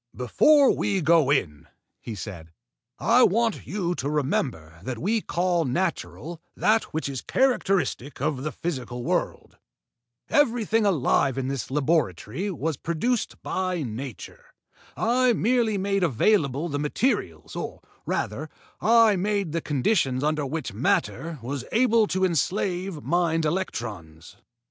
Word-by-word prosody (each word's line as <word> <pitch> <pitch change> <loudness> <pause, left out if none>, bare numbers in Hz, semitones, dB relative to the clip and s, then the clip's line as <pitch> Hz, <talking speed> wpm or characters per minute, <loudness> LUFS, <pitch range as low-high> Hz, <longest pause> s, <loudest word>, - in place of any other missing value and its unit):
"Before 275 - +4
we 195 -1 0
go 160 -3 +4
in," 75 - 0 0.3
he 115 - -7
said, 90 -5 -8 0.5
"I 240 +2 +4
want 230 0 +2
you 180 -4 -1
to 140 -4 -3
remember 125 - -2
that 120 +5 -5
we 215 - 0
call 175 -2 0
natural 135 - -3 0.2
that 220 +1 +3
which 160 -1 -4
is 135 -3 -4
characteristic 195 - 0
of 140 -1 -1
the 155 +2 -3
physical 125 -7 -4
world. - - -2 0.7
Everything 225 -6 +2
alive 140 -6 +2
in 135 0 -2
this 135 -2 -4
laboratory 140 - 0
was 160 -4 -2
produced 195 - -2
by 185 -3 -2
nature. 125 +1 -7 0.5
I 245 +2 +3
merely 230 -1 +1
made 195 0 0
available 155 - +2
the 145 -3 -3
materials, 145 - -1
or, - - -5 0.2
rather, 140 +10 -3 0.3
I 225 -1 +5
made 200 -2 -1
the 165 +1 -1
conditions 140 - +1
under 150 -1 0
which 155 -5 -4
matter 165 - 0
was 135 +2 -4
able 230 -2 +3
to 190 0 +1
enslave 180 0 -1
mind 165 -2 +1
electrons." 105 - -4
160 Hz, 130 wpm, -25 LUFS, 130-200 Hz, 0.7 s, I